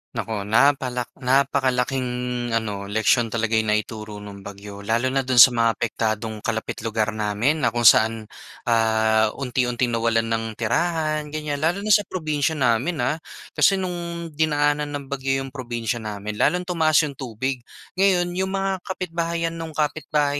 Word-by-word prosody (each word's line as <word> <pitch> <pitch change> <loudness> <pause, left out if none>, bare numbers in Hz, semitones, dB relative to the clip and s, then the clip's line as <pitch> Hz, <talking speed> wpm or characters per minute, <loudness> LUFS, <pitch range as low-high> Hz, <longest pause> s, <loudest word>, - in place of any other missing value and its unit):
Naku, 105 -3 -3
napala 125 +1 +2 0.2
napakalaking 130 -1 +1 0.5
ano, 100 -3 -3
leksiyon 110 +3 +2
talaga 115 0 0
'yong 110 - -2
naituro 105 -1 -5
no'ng 100 -1 -9
bagyo. 100 +1 -10
Lalo 115 +5 0
na 135 - +1
do'n 130 -1 -1
sa 125 +1 +10
mga 115 -1 +2
apektadong 110 -1 -2
kalapit 110 +1 -3
lugar 110 -1 -1
namin 110 +8 0
na 120 -2 0
kung 120 - 0
saan 110 0 +5 0.4
ah, 110 -1 +3
unti-unting 125 -2 -1
nawalan 115 0 +1
ng 115 -1 -2
tirahan 155 +5 0
ganyan. 150 -1 -4
Lalo 175 +7 0
na 215 - 0
sa 205 0 +5
probinsiya 155 -3 -1
namin 125 +3 +1
ah. 140 +6 0 0.3
Kasi 195 - +4
no'ng 170 -3 -4
dinaanan 145 -1 +1
ng 140 -1 -7
bagyo 135 0 -1
'yong 135 - -8
probinsiya 120 -2 -3
namin 105 -1 -6
lalong 180 0 +2
tumaas 160 -4 +1
'yong 140 -3 -5
tubig. 130 +1 -3 0.4
Ngayon 180 -3 +3
'yong 190 +2 -1
mga 195 -1 -1
kapitbahayan 170 -3 -2
no'ng 160 -2 -7
kapitbahay 150 -1 0
130 Hz, 155 wpm, -23 LUFS, 110-155 Hz, 0.5 s, sa